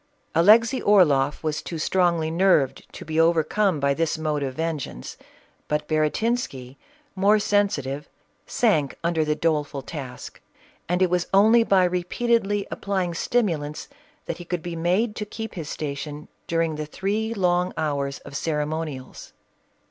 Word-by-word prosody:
Alexey 225 +9 +5
Orloff 150 -9 +3
was 155 -1 -1
too 170 - -6
strongly 170 -1 +1
nerved 170 -6 +2
to - - -10
be 160 0 -1
overcome 165 +2 +2
by 140 0 +2
this 165 +2 -1
mode 155 -2 -1
of 135 -2 -3
vengeance; 155 - -4 0.5
but 150 0 -1
Baratinsky, 155 - -1 0.4
more 200 +3 +4
sensitive, 195 -10 0 0.4
sank 205 - +1
under 165 -1 +1
the 150 0 0
doleful 150 -3 -1
task, 130 -4 -8 0.5
and 180 +1 +2
it 180 - +1
was 180 -1 +1
only 220 +4 +6
by 195 -4 +4
repeatedly 200 +3 0
applying 190 -3 -2
stimu 200 -3 +1
lants, 145 +1 -7 0.4
that 165 - -4
he - - -7
could 175 -1 -4
be 175 -1 -5
made 185 +7 0
to 210 - -2
keep 220 +1 -7
his 160 -4 -6
station 145 0 -5 0.2
during 165 -2 0
the 150 0 -4
three 210 +7 -2
long 180 -2 +1
hours 140 -2 -1
of 140 - -11
ceremonials. 150 -3 -4
165 Hz, 145 wpm, -24 LUFS, 150-195 Hz, 0.5 s, only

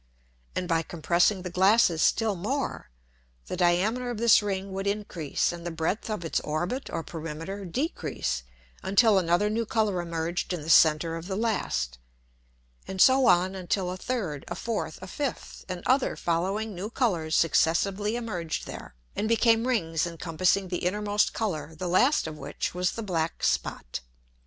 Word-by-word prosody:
And 180 - -2
by 165 -2 +2
compressing 175 +4 +1
the 180 - -5
Glasses 185 -2 +4
still 220 -3 +2
more, 255 - -3 0.6
the - - -4
diameter 190 +8 +1
of 240 - -3
this 230 -1 +6
Ring 195 -1 -3
would 195 +1 -3
increase, 200 -7 -1
and 170 -1 -8
the 175 - -3
breadth 165 +7 -2
of 210 -6 -3
its 165 - 0
Orbit 175 - -3
or 165 - -3
Perimeter 165 +5 -6
decrease 165 - -2 0.4
until 200 +1 +4
another 175 +3 +2
new 220 +2 0
Colour 210 -6 +1
emerged 170 +1 -2
in 170 -4 -4
the 160 - 0
center 160 +1 +5
of 165 +1 -8
the 190 - -3
last: 65 - -1 0.9
And 190 - -6
so 260 +3 +6
on 180 +2 +4
until 185 0 -2
a - - -4
third, 185 - -3
a - - -4
fourth, 185 -9 -3
a - - -7
fifth, 280 +6 -5
and 180 -1 -5
other 260 +1 +2
following 195 +6 -1
new 190 +4 -5
Colours 175 -11 0
successively 195 +6 +2
emerged 185 -9 -3
there, - - -9 0.2
and 215 - -1
became 230 0 +3
Rings 165 -9 0
encompassing 175 +3 0
the 180 - -2
innermost 205 +3 +1
Colour, 160 -8 -3
the 180 +3 -4
last 250 - +3
of 155 -1 -6
which 140 +1 -4
was 180 +1 0
the 230 - -5
black 165 -5 -2
Spot. - - -1
185 Hz, 165 wpm, -27 LUFS, 165-215 Hz, 0.9 s, this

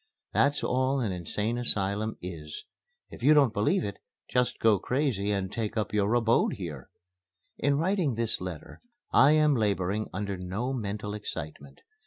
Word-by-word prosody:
That's 145 +1 +2
all 130 +2 +1
an 115 -6 -1
Insane 105 +6 -2
Asylum 105 -1 0
is. 80 -4 -7 0.5
If - - -11
you 150 +5 +6
don't 140 -6 +5
believe 105 0 +1
it, 100 -1 -5 0.3
just 125 -1 +1
go 110 -3 +4
crazy 125 -6 0
and 100 -2 -1
take 110 0 -3
up 105 -2 -1
your 105 0 +2
abode 115 -1 +3
here. 80 -9 -7 0.7
In 140 0 +2
writing 170 - +1
this 115 -3 -1
letter 90 -4 -7 0.3
I 140 +3 +6
am 155 -1 +4
laboring 105 -2 0
under 100 +1 -3
no 100 +9 -3
mental 105 -3 -4
excitement. 75 -8 -7
105 Hz, 155 wpm, -28 LUFS, 95-125 Hz, 0.7 s, you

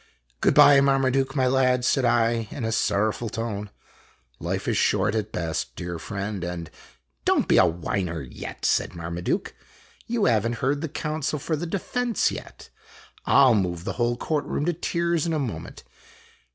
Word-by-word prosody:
" - - -40
Good - - +3
by, 140 -1 +8
Marmaduke, 135 0 +2
my 130 -2 +2
lad," 125 -1 +2
said 130 -1 +2
I, 115 -1 +2
in 120 - -5
a 115 - -1
sorrowful 110 +1 0
tone. 105 -2 -4 0.7
"Life - - -3
is - - +1
short 105 0 +2
at 110 -1 -2
best, 80 -2 -3
dear 85 -1 -5
friend, 100 0 -4
and 85 -2 -5 0.3
" 60 -1 -47
Don't - - +2
be - - +5
a 95 - +6
whiner 85 -1 -2
yet," 65 - -8
said - - +1
Marmaduke. 85 +1 -3 0.3
" - - -28
You 230 -3 0
have 115 -2 +3
n't 120 - -3
heard 140 +4 -1
the 160 - -3
counsel 155 0 -2
for 155 +3 -2
the 170 +3 -4
defense 235 +6 0
yet. - - -10 0.6
I 140 - +6
'11 120 -6 +5
move 85 -2 -3
the - - -3
whole 120 0 +1
court 150 +2 -1
room 145 - -2
to 175 - +1
tears 170 0 -1
in 165 - 0
a - - +1
moment." 130 -7 -5
120 Hz, 185 wpm, -25 LUFS, 95-140 Hz, 0.7 s, by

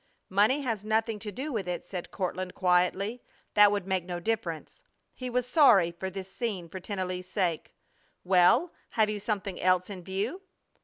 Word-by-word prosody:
"Money 210 +9 +3
has 225 -7 -2
nothing 220 0 0
to 210 0 -6
do 270 +8 -5
with 200 -5 -2
it," 175 -1 -3
said 180 -3 -6
Courtland, 185 -1 -3
quietly. 185 +5 +1 0.3
"That 205 -1 +7
would 200 -3 -1
make 190 -2 0
no 175 0 -5
difference." 180 - -3 0.3
He 255 -1 -6
was 250 0 0
sorry 240 - +6
for 190 +3 -5
this 190 0 -8
scene 200 -8 -3
for 190 - -7
Tennelly's 185 -1 -4
sake. 180 -5 -1 0.5
"Well, 185 - +4 0.2
have 215 -2 +3
you 210 - -3
something 200 -3 -3
else 185 +1 +2
in 185 -3 -7
view?" 205 - -3
195 Hz, 170 wpm, -29 LUFS, 180-220 Hz, 0.5 s, That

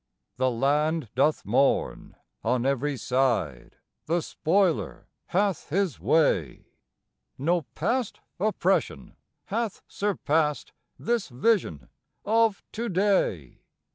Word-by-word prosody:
The 130 0 +2
land 145 +3 0
doth 145 +5 +1
mourn. 125 +7 +1 0.3
On 125 +2 0
every 140 +1 0
side 120 - -1 0.3
the 170 +1 +1
spoiler 175 +1 0 0.2
hath 195 -3 0
his 185 -1 0
way; 140 - +1 0.7
No 170 +5 +1
past 250 -3 -1 0.2
oppression 195 -2 0 0.3
hath 225 0 -3
surpassed 160 -7 -1 0.2
this 235 -6 -1
vision 125 - 0 0.4
of 225 -1 +2
to 235 +1 -3
day. 185 - 0
160 Hz, 95 wpm, -26 LUFS, 130-200 Hz, 0.7 s, The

